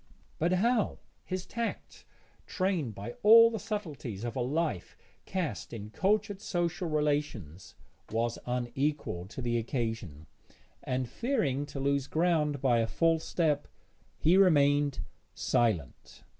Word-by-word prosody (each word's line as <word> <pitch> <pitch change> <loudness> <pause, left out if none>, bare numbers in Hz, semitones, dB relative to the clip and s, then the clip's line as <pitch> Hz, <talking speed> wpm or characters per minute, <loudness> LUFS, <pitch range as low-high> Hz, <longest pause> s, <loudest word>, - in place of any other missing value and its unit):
But 170 +3 +2
how? 220 +3 +2 0.3
His 185 0 -4
tact, 235 -1 -5 0.4
trained 180 - -1
by 100 +4 -6
all 230 +2 +8
the 225 - -3
subtleties 145 - -5
of 120 -1 -4
a 130 - -1
life 140 - -2 0.3
cast 185 -9 -3
in 105 -2 -7
cultured 205 - 0
social 175 -2 -1
relations, 145 - -2 0.3
was 115 +1 -1
unequal 125 - -2
to 125 +5 -7
the 120 -1 +1
occasion, 110 - -4 0.6
and, 130 0 -2
fearing 145 - -1
to 140 -1 -7
lose 140 0 0
ground 155 -4 +1
by 120 -3 +4
a 115 - +1
false 165 +4 +1
step, 150 -4 0 0.5
he 170 +4 +4
remained 145 - +4 0.3
silent. 90 - -1
145 Hz, 125 wpm, -30 LUFS, 120-180 Hz, 0.6 s, all